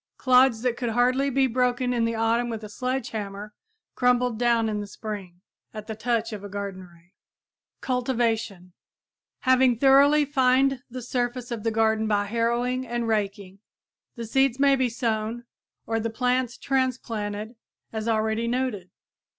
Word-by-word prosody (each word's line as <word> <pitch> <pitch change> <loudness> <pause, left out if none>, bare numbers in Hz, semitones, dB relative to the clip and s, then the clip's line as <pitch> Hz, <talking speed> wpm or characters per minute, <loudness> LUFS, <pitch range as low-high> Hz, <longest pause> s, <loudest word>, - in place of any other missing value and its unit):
Clods 255 -3 +4
that 245 -2 0
could 240 -2 -2
hardly 250 +4 +2
be 270 0 +2
broken 250 0 0
in 235 -2 +1
the 230 0 -1
autumn 230 +2 +1
with 225 -2 -5
a 210 - -7
sledge 255 +4 -3
hammer 210 -1 -6 0.4
crumbled 245 -2 +1
down 235 -2 +2
in 210 -1 -2
the 205 - -5
spring 195 -4 -7 0.3
at 215 -1 -6
the 220 - -5
touch 230 0 -1
of 205 -1 -7
a 205 - -7
garden 195 -2 -6
rake! 170 +2 -24 0.7
CULTIVATION 230 -7 -1 0.7
Having 255 -2 +4
thoroughly 280 +3 +5
fined 265 -1 +2
the 250 0 -7
surface 245 0 -3
of 235 -2 -3
the 225 - 0
garden 220 0 +1
by 205 -1 +1
harrowing 235 +3 0
and 240 -2 -3
raking, 200 -3 -2 0.6
the 235 -2 -6
seeds 270 +2 +2
may 280 0 +5
be 260 -2 +1
sown 230 0 -2 0.4
or 225 0 -1
the 230 +1 -2
plants 250 +1 0
transplanted 230 -5 -2 0.4
as 220 0 -3
already 220 +1 0
noted. 235 -7 -2
235 Hz, 155 wpm, -25 LUFS, 215-250 Hz, 0.7 s, thoroughly